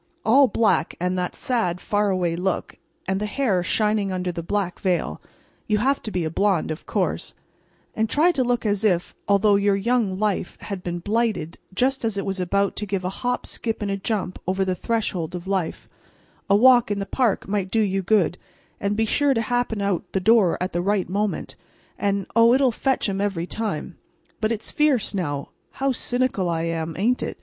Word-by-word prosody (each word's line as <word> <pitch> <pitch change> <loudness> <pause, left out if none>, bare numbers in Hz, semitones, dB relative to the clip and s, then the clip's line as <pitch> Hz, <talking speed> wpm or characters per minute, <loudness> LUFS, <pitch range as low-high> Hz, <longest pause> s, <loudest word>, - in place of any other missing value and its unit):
All 270 +5 +6
black, 220 -9 +1
and 180 +1 0
that 180 - -3
sad, 200 -9 0
faraway 185 -4 0
look, 180 +2 -2 0.3
and 190 +1 0
the 210 - -1
hair 210 -5 +1
shining 210 +2 +1
under 180 -1 -2
the 170 - -5
black 185 +1 -2
veil 175 - -1 0.5
(you 210 - +2
have 270 +6 +1
to - - -5
be 180 -4 -1
a 160 - -2
blonde, 195 -3 +1
of 155 - -7
course), - - -1 0.6
and 220 0 0
try 320 +7 +4
to 275 -6 0
look 245 -1 0
as 205 -1 0
if, 180 -5 +1
although 200 0 +4
your 200 0 +2
young 210 -2 +1
life 205 -3 -1
had 195 -3 -5
been 175 -1 -3
blighted 205 -4 -1
just 255 +8 0
as 225 -3 -1
it 195 - -2
was 195 -1 -2
about 200 +2 0
to 210 - -3
give 190 -2 -2
a 185 - -1
hop 245 0 -1
skip 225 -2 -3
and 205 -1 -2
a - - 0
jump 195 -2 -3
over 190 +1 +1
the 185 - 0
threshold 180 -5 -2
of 175 0 -6
life, 190 -4 -2 0.6
a 200 - +6
walk 245 +1 +6
in 205 - -1
the 200 - -2
park 235 -2 0
might 195 -2 -1
do 225 +3 +2
you 195 -2 +1
good, 185 -3 +2 0.4
and 200 +1 -1
be 225 - +2
sure 280 +4 +2
to 230 - +1
happen 245 -3 -1
out 200 -4 0
the 190 - +2
door 210 -2 +4
at 180 +1 -3
the 175 - 0
right 195 0 0
moment, 205 +2 -2 0.4
and—oh, 205 +4 +3
it'll 265 -2 +3
fetch 265 +2 0
'em 195 -1 -2
every 195 -5 -1
time. 220 +3 -4 0.4
But 215 0 0
it's 225 -2 -3
fierce, 285 -9 +2
now, 145 -7 -3 0.2
how 270 0 0
cynical 245 -7 0
I 165 -1 -1
am, 165 -1 -2
ain't 235 +7 +1
it? - - -4
200 Hz, 200 wpm, -23 LUFS, 185-225 Hz, 0.6 s, All